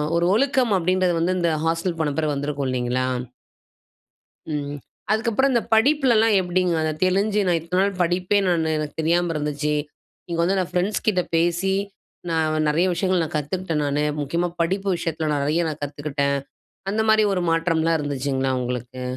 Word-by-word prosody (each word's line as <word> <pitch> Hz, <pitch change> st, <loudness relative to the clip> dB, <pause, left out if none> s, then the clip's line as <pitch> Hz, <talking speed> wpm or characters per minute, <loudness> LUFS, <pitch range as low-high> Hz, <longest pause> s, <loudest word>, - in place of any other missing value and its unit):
ஒரு 170 Hz, 0 st, +2 dB
ஒழுக்கம் 255 Hz, -1 st, +2 dB
அப்டின்றது 185 Hz, 0 st, +1 dB
வந்து 185 Hz, +2 st, +1 dB
இந்த 170 Hz, -1 st, +1 dB
ஹாஸ்டல் 165 Hz, +1 st, -1 dB
போன 150 Hz, -2 st, 0 dB
பிறகு 155 Hz, -2 st, 0 dB
வந்திருக்கும் 140 Hz, -1 st, -2 dB
இல்லைங்களா, 130 Hz, 0 st, -1 dB, 1.4 s
ம். 145 Hz, -1 st, -3 dB, 0.4 s
அதுக்கப்புறம் 230 Hz, +5 st, +2 dB
இந்த 235 Hz, -2 st, +2 dB
படிப்புலலாம் 230 Hz, -3 st, +4 dB
எப்பிடிங்க, 180 Hz, -1 st, 0 dB
அத 155 Hz, 0 st, 0 dB
தெளிஞ்சு 200 Hz, +3 st, +2 dB
நான் 175 Hz, -2 st, +2 dB
இத்தன 180 Hz, +3 st, -1 dB
நாள் 195 Hz, -2 st, -1 dB
படிப்பே 180 Hz, +3 st, +1 dB
நானு 160 Hz, -2 st, +1 dB
எனக்கு 150 Hz, -1 st, -4 dB
தெரியாம 170 Hz, +2 st, +1 dB
இருந்துச்சு. 150 Hz, 0 st, -1 dB, 0.5 s
இங்க 170 Hz, -1 st, -3 dB
வந்து 185 Hz, +3 st, +2 dB
நான் 185 Hz, -1 st, -1 dB
ஃப்ரெண்ட்ஸ்கிட்ட 190 Hz, +1 st, +1 dB
பேசி, 175 Hz, +3 st, +1 dB, 0.6 s
நான் 155 Hz, -1 st, +1 dB
நிறைய 165 Hz, +5 st, +2 dB
விஷயங்கள் 185 Hz, 0 st, +1 dB
நான் -, -, -8 dB
கத்துக்கிட்டேன் 160 Hz, +1 st, -2 dB
நானு. 145 Hz, +1 st, 0 dB, 0.2 s
முக்கியமா 170 Hz, +5 st, -1 dB
படிப்பு 195 Hz, +4 st, -1 dB
விஷயத்தில 165 Hz, -2 st, -2 dB
நிறைய 150 Hz, +5 st, +1 dB
நான் 155 Hz, -1 st, -5 dB
கத்துக்கிட்டேன். 145 Hz, -1 st, -1 dB, 0.5 s
அந்த 215 Hz, +2 st, 0 dB
மாரி 220 Hz, -1 st, +5 dB
ஒரு 180 Hz, -, -1 dB
மாற்றம்லாம் 165 Hz, 0 st, +1 dB
இருந்துச்சுங்களா 135 Hz, -2 st, -1 dB
உங்களுக்கு? 125 Hz, +1 st, -5 dB
170 Hz, 150 wpm, -23 LUFS, 150-185 Hz, 1.4 s, மாரி